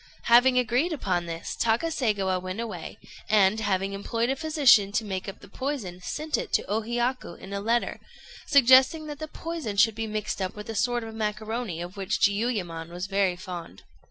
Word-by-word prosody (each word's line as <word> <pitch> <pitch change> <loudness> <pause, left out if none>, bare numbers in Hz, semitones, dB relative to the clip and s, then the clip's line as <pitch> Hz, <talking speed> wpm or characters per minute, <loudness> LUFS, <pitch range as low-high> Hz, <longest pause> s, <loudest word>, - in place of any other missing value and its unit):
Having 245 +2 +5
agreed 250 +8 +2
upon 180 - -1
this, 165 0 -5
Takaségawa 225 - 0
went 185 +3 -5
away, 210 -8 -6 0.3
and, 210 0 +4
having 195 -2 0
employed 230 +5 -1
a - - 0
physician 270 -9 +4
to 220 - 0
make 190 -1 -4
up 195 - -10
the - - -13
poison, 215 -7 -4
sent 305 +10 -2
it - - -6
to - - +2
O 215 +3 -1
Hiyaku 240 -3 -2
in 195 - -10
a 200 - -2
letter, 230 +3 0 0.5
suggesting 270 +3 +6
that 295 -1 -7
the 310 - -5
poison 315 -10 -5
should 220 +2 +5
be 225 +1 -4
mixed 215 -2 -3
up 185 -1 -3
with 210 +1 -7
a - - -7
sort 240 +2 0
of 225 0 -8
macaroni, 215 -3 -3
of 180 +3 -9
which 195 +2 -1
Jiuyémon 200 -6 0
was 175 +1 -5
very 195 -2 +1
fond. 175 - -8
215 Hz, 185 wpm, -26 LUFS, 190-245 Hz, 0.5 s, suggesting